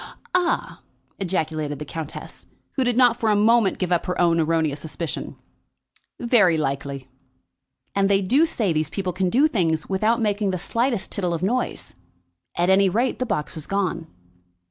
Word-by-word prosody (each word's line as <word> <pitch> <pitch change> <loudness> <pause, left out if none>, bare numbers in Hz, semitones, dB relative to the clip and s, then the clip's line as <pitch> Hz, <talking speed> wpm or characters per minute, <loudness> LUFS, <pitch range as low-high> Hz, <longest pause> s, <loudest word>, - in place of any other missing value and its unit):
"Ah!" 360 -1 0 0.4
ejaculated 155 -5 -2
the 150 - -6
countess, 160 0 -8 0.2
who 265 - 0
did 245 -1 +1
not 245 -2 +4
for 225 - +1
a 210 - +4
moment 220 0 +3
give 180 -1 -2
up 175 - +1
her 180 0 -2
own 170 -1 +3
erroneous 160 -2 +1
suspicion; 160 +1 -5 0.8
"very 230 -9 +4
likely." 140 -2 -3 0.9
"And 195 0 +2
they 200 0 +3
do 275 - +3
say 210 - 0
these 155 -1 0
people 185 -3 -3
can 185 0 0
do 270 +10 +4
things 165 - 0
without 215 +5 +1
making 210 -2 0
the 185 - -1
slightest 230 +4 -1
tittle 180 -3 -1
of 165 - -5
noise. 245 +6 -2 0.6
At 175 +2 +3
any 195 0 +5
rate, 235 +7 0
the 255 - -1
box 150 -8 -2
was 155 -2 -7
gone." 180 -5 -1
190 Hz, 165 wpm, -23 LUFS, 160-225 Hz, 0.9 s, any